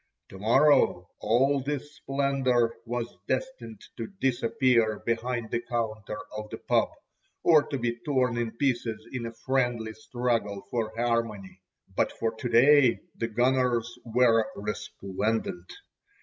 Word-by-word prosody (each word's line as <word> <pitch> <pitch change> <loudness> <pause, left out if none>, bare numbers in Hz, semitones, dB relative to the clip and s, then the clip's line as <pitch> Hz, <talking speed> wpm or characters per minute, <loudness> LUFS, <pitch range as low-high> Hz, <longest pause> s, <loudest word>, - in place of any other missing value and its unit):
To 95 - -11
morrow 115 -5 +4
all 135 +5 +3
this 145 +1 -4
splendour 135 -4 +1
was 120 -5 -4
destined 185 - -3 0.2
to 115 - -4
disappear 120 -3 +2
behind 115 0 -2
the 120 - +1
counter 110 -3 -3 0.2
of 105 0 -6
the - - -6
"pub," - - +1 0.5
or 160 -3 +6
to 140 - -2
be 120 -1 -2
torn 130 -5 +1
in 120 -1 -1
pieces 120 -5 -1
in 125 -3 -4
a - - -6
friendly 120 -4 0
struggle 115 -3 -2
for 115 -2 -1
harmony. 110 -6 -1 0.3
But - - +1
for 115 - -2
to 120 +2 -4
day 130 +2 +5
the 115 - -2
"gunners" 120 0 +1
were 115 -2 +3
resplendent. 100 -2 -3
120 Hz, 130 wpm, -28 LUFS, 110-130 Hz, 0.5 s, or